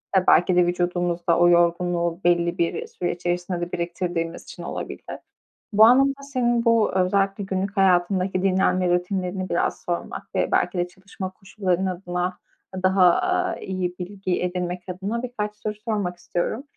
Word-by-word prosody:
Ya, 185 - +5
belki 180 +1 +5
de 180 -1 +5
vücudumuzda 175 -1 0
o 175 0 +6
yorgunluğu 170 0 +2
belli 175 0 +2
bir 170 -1 -1
süre 175 - -3
içerisinde 175 0 -2
de 175 - -4
biriktirdiğimiz 170 -1 -3
için - - -10
olabilir. - - -6 0.7
Bu 215 +2 +7
anlamda 275 +3 +5
senin 240 -4 0
bu 230 -2 +3
özellikle 195 +2 +1
günlük 195 +1 -3
hayatındaki 185 0 +2
dinlenme 185 -1 +2
rutinlerini 185 0 -2
biraz 170 - 0
sormak 175 -1 -4
ve - - +1
belki 180 - +1
de 175 0 0
çalışma 190 0 -8
koşulların 190 -1 -2
adına 180 0 -3 0.4
daha, 185 0 +4
aaa, 365 0 0
iyi 185 -2 -3
bilgi 185 0 -3
edinmek 180 0 -2
adına 200 +6 -3
birkaç 210 -4 -4
soru 210 0 -4
sormak 205 -6 -1
istiyorum. 175 +7 -3
185 Hz, 145 wpm, -24 LUFS, 175-195 Hz, 0.7 s, Bu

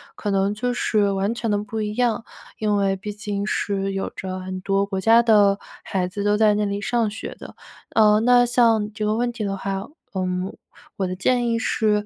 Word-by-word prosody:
可 205 - -4
能 195 +1 +1
就 245 +3 -2
是 210 -4 +1
完 195 +3 0
全 230 -1 -3
的 205 - +2
不 210 +2 -4
一 210 0 -3
样， 240 -2 +1 0.4
因 210 -1 +1
为 195 -1 +1
毕 205 +2 -6
竟 205 -1 -4
是 195 -2 -1
有 195 - -2
着 185 -1 -5
很 185 0 -6
多 195 +1 +1
国 190 -1 -3
家 230 +2 +5
的 205 -3 +5 0.3
孩 185 -2 -1
子 200 +2 -5
都 205 0 +2
在 215 -1 +4
那 210 0 0
里 200 0 -2
上 225 +1 0
学 220 - -7
的。 - - -11 0.4
呃， 215 -1 +5
那 245 +2 +5
像 225 -3 +2
这 215 - -4
个 210 +1 +1
问 240 +1 0
题 230 -3 -5
的 195 -1 -2
话， 195 0 -4 0.3
嗯， 185 0 -2 0.4
我 190 -2 0
的 185 - -4
建 240 +6 +1
议 230 - +1
是， 210 -2 +1
210 Hz, 230 characters per minute, -23 LUFS, 195-220 Hz, 0.4 s, 家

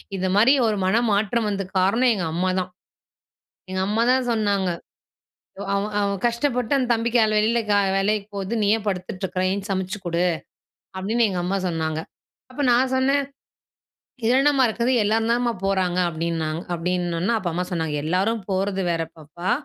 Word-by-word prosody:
இது 185 0 -1
மாரி 230 +7 +6
ஒரு 215 -1 0
மனமாற்றம் 215 +2 +1
வந்ததுக்கு 195 -1 -4
காரணம் 230 +7 +3
எங்க 190 -5 -2
அம்மாதான். 185 +1 0 1.0
எங்க 185 - -1
அம்மா 220 +2 +1
தான் 260 -1 +1
சொன்னாங்க, 205 -4 +1 1.1
"அவன் 200 +2 -1
அவன் 200 -1 -1
கஷ்டப்பட்டு 245 +1 0
அந்த 255 -2 0
தம்பி 230 +1 -1
காலைல 220 -2 +4
வெளில 225 +3 +2
கா 205 - +4 0.2
வேலைக்கு 205 +1 0
போகுது. 195 +3 -3
நீ - - +2
ஏன் 215 - -9
படுத்துட்டுருக்கிற? 185 -1 -3
எந்திருச்சு 200 +1 -3
சமைச்சுக் 190 +1 -4
குடு." 170 0 0 0.7
அப்படின்னு 220 +5 +1
எங்க 180 -2 -2
அம்மா 195 +2 0
சொன்னாங்க. 160 -2 -2 0.5
அப்ப 270 - -5
நான் 255 +2 +3
சொன்னேன், 275 +2 +2 1.0
"இதுல 245 +3 +4
என்னம்மா 275 -3 +4
இருக்குது? 235 +3 0
எல்லாரும் 225 +2 +1
தானம்மா 240 0 +1
போறாங்க." 185 -2 0
அப்படின்னாங் 165 0 -2
அப்படின்னொன்ன, 175 +3 -1
அப்ப 185 -5 -3
அம்மா 180 +1 -1
சொன்னாங்க, 160 -3 -1
"எல்லாரும் 195 +6 0
போறது 195 0 0
வேற 165 -1 -1
பாப்பா! 165 +4 -5
200 Hz, 155 wpm, -23 LUFS, 180-230 Hz, 1.1 s, மாரி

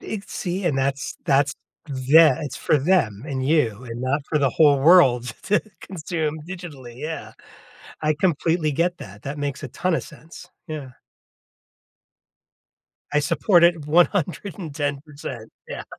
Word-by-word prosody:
It's 205 -2 -7
see, 185 +1 -3
and 150 -6 +1
that's 135 0 -1
that's 140 0 +2 0.3
tha 140 +1 +5
it's 145 -3 -5
for - - +2
them, 135 - +1
and 130 -3 -3
you, 125 -7 +1
and 120 -1 -7
not 135 +3 0
for 150 - +1
the 140 -2 +2
whole 145 +1 +4
world 130 -7 +5
to 210 +2 +2 0.2
consume 160 -3 -4
digitally, 160 -10 -9
yeah. 155 +4 -6 0.7
I 155 0 +1
completely 160 -1 +1
get 175 +4 0
that, 100 +2 -11
that 140 +2 -5
makes 145 -2 -3
a 140 - -5
ton 180 +8 -1
of - - -1
sense. 160 +1 -13 0.2
Yeah. 150 -4 -6 2.2
I 150 - +3
support 170 +4 +3
it 170 -4 +2
110%, 150 - -1 0.2
yeah. - - -6
150 Hz, 140 wpm, -23 LUFS, 135-170 Hz, 2.2 s, tha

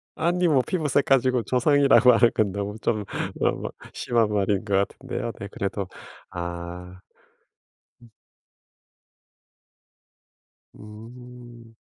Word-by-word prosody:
아니 175 +2 +1
뭐 140 -5 +4
피부색 150 -6 0
가지고 130 -3 +2
조상이라 140 +2 +4
말할 120 -1 +6
건 105 -3 0
너무 100 +1 -4
좀 110 -2 0 0.4
어 - - 0 0.2
심한 115 -3 +1
말인 100 0 0
것 100 -2 0
같은데요. 100 +3 -2
네 100 - -6
그래도 100 -1 -3 0.4
아. 85 +1 -7 1.0
음. 120 - -17 2.7
음. 120 +2 -13
115 Hz, 180 characters per minute, -24 LUFS, 100-125 Hz, 2.7 s, 말할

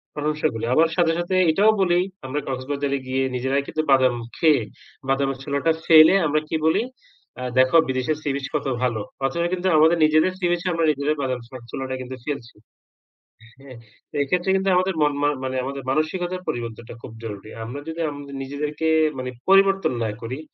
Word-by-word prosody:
প্রশংসা 150 +1 0
করি 115 - -5
আবার 160 +4 +5
সাথে, 170 -2 +3
সাথে 175 +2 -1 0.2
এটাও 205 +7 +4
বলি 175 -2 +3 0.3
আমরা 135 +3 -2
কক্সবাজারে 140 +2 -2
গিয়ে, 130 +1 0
নিজেরাই 130 +2 0
কিন্তু 155 - -1
বাদাম 130 -2 +4 0.2
খেয়ে 155 -6 +4 0.5
বাদামের 135 0 0
ছোলাটা 140 +3 0
ফেলে 160 +1 +8
আমরা 150 +1 +2
কি 160 - 0
বলি? 160 - +2 0.6
আ - - -3 0.2
দেখো 130 +6 +5
বিদেশের 130 +4 -1
সি 150 - -2
বিচ 140 -1 -4
কত 145 - -1 0.2
ভালো। 120 -4 0 0.2
অথচ 135 - -2 0.2
কিন্তু 185 0 -1
আমাদের 160 +2 +5
নিজেদের 155 +4 +3
সি 180 - -1
বিচে 175 +1 -1
আমরা 165 -1 +1
নিজেরা 145 +1 -1
বাদাম 130 -2 -2
এর - - -13
চ - - -44 0.2
ছোলাটা 130 -1 -4
কিন্তু 130 +1 -7
ফেলছি।" 140 -5 -5 1.1
হ্যাঁ? 135 -3 -12 0.4
এই 140 - +2
ক্ষেত্রে 180 +3 0
কিন্তু 190 0 +1
আমাদের 185 0 +1
মন 145 -1 +2
মা 145 - +3
মানে, 130 0 -3
আমাদের 135 +1 -5
মানসিকতার 175 +5 -1
পরিবর্তনটা 115 -1 -5
খুব - - -9
জরুরি। 105 -2 -7
আমরা 120 +6 -6
যদি 160 +1 -6
আমাদের 145 -1 -9
নিজেদেরকে 150 +3 -3 0.3
মানে 130 0 -4 0.2
পরিবর্তন 195 -4 +4
না 110 - -1
করি, 125 +4 -5
145 Hz, 180 wpm, -23 LUFS, 130-165 Hz, 1.1 s, ফেলে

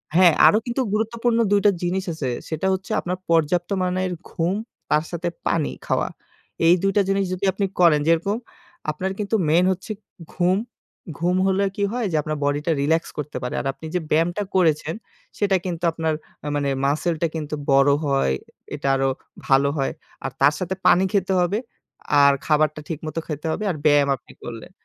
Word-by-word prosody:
হ্যাঁ, 175 -2 +7
আরো 210 - +5
কিন্তু 245 +2 -1
গুরুত্বপূর্ণ 230 +2 0
২ 205 - +5
টা 205 - +7
জিনিস 185 +2 0
আছে। 145 -5 -3 0.2
সেটা 160 +4 -1
হচ্ছে 190 0 -4
আপনার 180 +1 -3
পর্যাপ্ত 170 +2 +2
মানের 185 0 0 0.2
ঘুম, 175 +3 -1 0.3
তার 150 +1 +3
সাথে 175 0 -3 0.2
পানি 160 -4 +1 0.2
খাওয়া। - - 0 0.6
এই 170 - +8
২ 195 - +3
টা - - +6
জিনিস 195 0 +2
যদি 185 +2 -2
আপনি 200 0 0
করেন 165 -4 +6
যেরকম 170 +6 +2 0.5
আপনার 185 +5 -3
কিন্তু 210 +2 0
মেইন 175 +3 +4
হচ্ছে 185 +3 -5 0.4
ঘুম। 180 +1 +2 0.6
ঘুম 175 +2 +1
হলে 195 +1 +2
কি 205 - -1
হয় 245 -2 -1
যে - - -1
আপনার 155 +1 -3
বডিটা 145 +3 0
রিল্যাক্স 160 +3 +1
করতে 150 0 -4
পারে। 125 - -3
আর - - -10
আপনি 160 - -12
যে - - +3
ব্যায়ামটা 170 +6 +1
করেছেন 160 -2 +2 0.4
সেটা 200 -2 +2
কিন্তু 175 -2 -4
আপনার 160 -1 -1 0.3
আ - - -3
মানে 145 -1 0 0.2
মাসলটা 160 +3 0
কিন্তু 150 -1 -3 0.2
বড় 135 +1 +5 0.2
হয়। 135 - +2 0.4
এটা - - -4
আরো 135 0 +1 0.4
ভালো 135 +1 +4
হয়। 135 - 0 0.3
আর 135 - -2
তার 145 +2 +6
সাথে 185 +1 -2
পানি 185 - +6
খেতে 195 -1 +1
হবে। 180 +4 +1 0.6
আর 140 0 +7
খাবারটা 155 0 +2
ঠিক 160 -3 -3
মতো 155 +1 -3
খেতে 150 0 -5
হবে। 215 - -3
আর 155 - -5
ব্যায়াম 145 -2 +5
আপনি 125 - -18
করলেন। 115 +5 -8
170 Hz, 180 wpm, -23 LUFS, 150-190 Hz, 0.6 s, এই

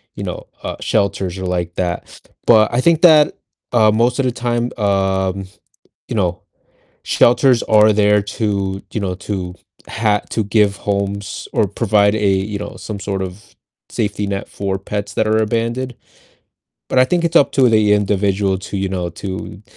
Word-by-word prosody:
you - - -6
know, - - -6 0.2
uh, - - -4
shelters 95 -3 -1
or 95 - -5
like 85 -1 -2
that, 90 -1 -4 0.3
but 110 -1 +5
I 125 - +2
think 165 0 +3
that, 155 -3 +6 0.3
uh, 110 -3 +4
most 120 +3 +1
of 135 - +2
the 125 - +1
time, 120 0 -2
um, 95 -2 0 0.6
you - - -3
know, 90 -3 0 0.6
shelters 125 0 +4
are 110 0 +5
there 105 0 +3
to 100 -2 -2
you 110 - -2
know, 95 -2 -2
to 95 -2 -5 0.3
ha 105 -2 +1
to 110 - -1
give 100 -1 +2
homes, 100 -1 -3
or 105 - +2
provide 100 0 +2
a 105 -2 0
you 100 +2 0
know, 105 - -7
some 105 -2 -7
sort 100 -1 -3
of 95 +2 -9 0.4
safety 105 -2 -2
net 100 0 -4
for 95 -1 -3
pets 100 +1 -5
that 110 - +1
are 110 0 +2
abandoned. 115 +3 -1 0.9
But 130 - +3
I 130 - +7
think 170 +4 0
it's 165 - -1
up 140 - +5
to 130 -3 +4
the 110 -2 +3
individual 100 -1 +1
to 100 - -6
you 95 0 -1
know, 90 -2 -3
to 95 +2 -7
105 Hz, 175 wpm, -18 LUFS, 95-110 Hz, 0.9 s, I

